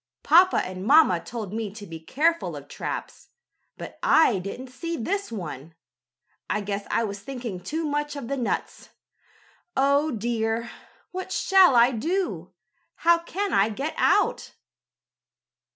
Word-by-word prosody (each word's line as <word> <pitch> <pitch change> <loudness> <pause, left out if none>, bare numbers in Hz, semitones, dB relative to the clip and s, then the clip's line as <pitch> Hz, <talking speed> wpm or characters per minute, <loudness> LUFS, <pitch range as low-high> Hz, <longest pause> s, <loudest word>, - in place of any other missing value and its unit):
Papa 350 +5 +6
and 185 0 -6
mamma 270 - +5
told 220 -4 -6
me 220 -1 -3
to 210 -2 -9
be 165 -3 -8
careful 320 - 0
of - - -9
traps, - - -6 0.5
but - - -9
I 250 -11 +4
didn't 220 +8 -7
see 335 +6 -5
this 395 - -2
one. 160 - -7 0.7
I 210 - 0
guess 200 0 -4
I 230 - +1
was 200 -2 -4
thinking 240 -5 -6
too 315 - -3
much 295 0 -2
of 280 -5 -6
the 275 - -2
nuts. 250 -4 -3 0.9
Oh 280 +3 +3
dear! 230 -1 -2 0.4
What 370 +1 -6
shall 380 -7 +5
I 240 +2 +6
do? 225 - -2 0.5
How 340 0 +6
can 385 +3 -3
I 195 +3 +4
get 275 +9 -4
out?" - - +1
245 Hz, 140 wpm, -25 LUFS, 205-320 Hz, 0.9 s, Papa